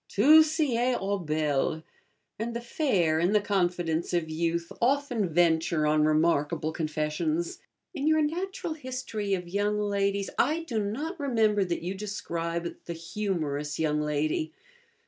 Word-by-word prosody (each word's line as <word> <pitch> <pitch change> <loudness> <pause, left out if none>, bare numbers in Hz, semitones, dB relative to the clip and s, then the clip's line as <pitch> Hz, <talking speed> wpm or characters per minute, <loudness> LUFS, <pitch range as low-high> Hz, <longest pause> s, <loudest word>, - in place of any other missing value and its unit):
'Tout 305 +10 +7
sied 255 -6 +1
aux 200 +1 -1
belles,' 155 -1 0 0.6
and 230 +1 -3
the - - -1
fair, 195 - +1
in 175 +5 +2
the 210 - +5
confidence 175 -5 0
of 160 -2 -1
youth, 170 +1 -1
often 250 - +1
venture 165 -1 +2
on 150 0 +3
remarkable 155 0 +1
confessions. 155 +1 -2 0.3
In 295 -3 -2
your 315 0 +4
'Natural 345 +2 -3
History 255 -8 -3
of 180 -2 -6
Young 205 +3 0
Ladies' 200 -1 0
I 310 +6 +2
do 230 -9 -2
not 295 - -4
remember 220 -7 +2
that 170 -2 -3
you 180 +2 -2
describe 170 -4 -4
the 170 - -4
Humorous 165 -5 -3
Young 150 -1 +1
Lady 150 +1 0
(1). 160 - -22
185 Hz, 145 wpm, -28 LUFS, 160-235 Hz, 0.6 s, Tout